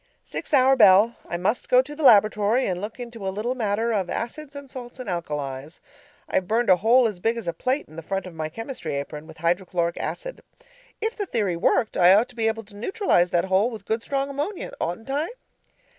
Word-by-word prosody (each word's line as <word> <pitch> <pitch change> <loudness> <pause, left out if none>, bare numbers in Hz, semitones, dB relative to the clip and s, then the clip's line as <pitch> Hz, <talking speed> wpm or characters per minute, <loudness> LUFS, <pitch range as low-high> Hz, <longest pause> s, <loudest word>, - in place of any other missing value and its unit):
Sixth - - -6
hour 270 -2 +5
bell 210 0 +6
I 175 - -2
must 195 +7 -1
go 250 0 +6
to 295 +3 -9
the 315 - -7
laboratory 215 0 +5
and 180 -1 -2
look 215 +4 -6
into 235 -5 -6
a - - +1
little 215 +6 -2
matter 225 -1 -1
of 190 -4 -1
acids 285 +5 -5
and 280 -1 -8
salts 250 -2 -9
and 255 -3 -8
alkalis. 150 -4 -4 0.5
I've 185 - 0
burned 225 0 +2
a 180 - +6
hole 235 +6 +4
as 205 -5 -6
big 225 +5 0
as 230 - -6
a 170 - 0
plate 260 - -1
in 155 - -15
the - - -5
front 195 +4 -3
of 185 - -9
my 155 -1 -4
chemistry 225 - -5
apron, 150 +2 -6
with 160 - -13
hydrochloric 170 0 -1
acid. - - -5 0.6
If 445 +1 -1
the 410 -3 -4
theory 205 - 0
worked, 210 +6 +1
I 180 +1 +7
ought 225 +5 +2
to 250 - -15
be 225 -2 0
able 225 0 -1
to 205 0 -15
neutralize 230 - +1
that 175 0 +1
hole 190 +4 +2
with 225 -3 -9
good 220 +1 -1
strong 275 +2 -2
ammonia, 290 +8 -4
oughtn't 200 +10 -3
I? 295 +4 0
220 Hz, 220 wpm, -24 LUFS, 180-255 Hz, 0.6 s, I